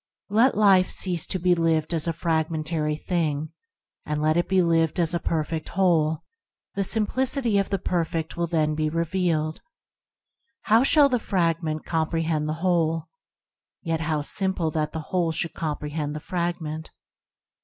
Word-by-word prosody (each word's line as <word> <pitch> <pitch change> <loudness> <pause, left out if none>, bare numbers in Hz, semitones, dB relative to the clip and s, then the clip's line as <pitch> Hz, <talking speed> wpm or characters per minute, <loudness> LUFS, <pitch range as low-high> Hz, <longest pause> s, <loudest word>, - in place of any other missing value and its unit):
Let 230 +4 +3
life 195 -3 +5
cease 180 -3 0
to 190 - -1
be 180 0 +3
lived 165 -1 +1
as 165 0 -1
a - - +2
fragmentary 160 -1 -1
thing, 155 -2 -2 0.5
and 150 0 -3
let 155 +1 +2
it 175 - 0
be 190 -1 +3
lived 165 -1 +1
as 170 -1 +1
a 170 - 0
perfect 160 -1 -2
Whole; 165 -4 +1 0.5
the 200 - -1
simplicity 230 +2 +2
of 195 - -1
the 195 - 0
Perfect 165 -3 -2
will 170 0 -1
then 155 -2 +1
be 155 0 -1
revealed. 165 -1 -1 1.0
How 220 +2 +4
shall 285 +2 +6
the 250 -3 0
fragment 165 -6 -1
com 160 -2 -1
prehend 160 -2 -1
the 155 - -1
Whole? 165 -3 +1 0.7
Yet 165 -2 -1
how 155 -2 -1
simple 190 -1 0
that 150 -1 -1
the 160 - -4
Whole 175 -3 +1
should 165 +1 -2
comprehend 150 -1 -4
the - - -4
frag 175 +1 -2
ment. 155 +1 -6
165 Hz, 160 wpm, -25 LUFS, 155-180 Hz, 1.0 s, shall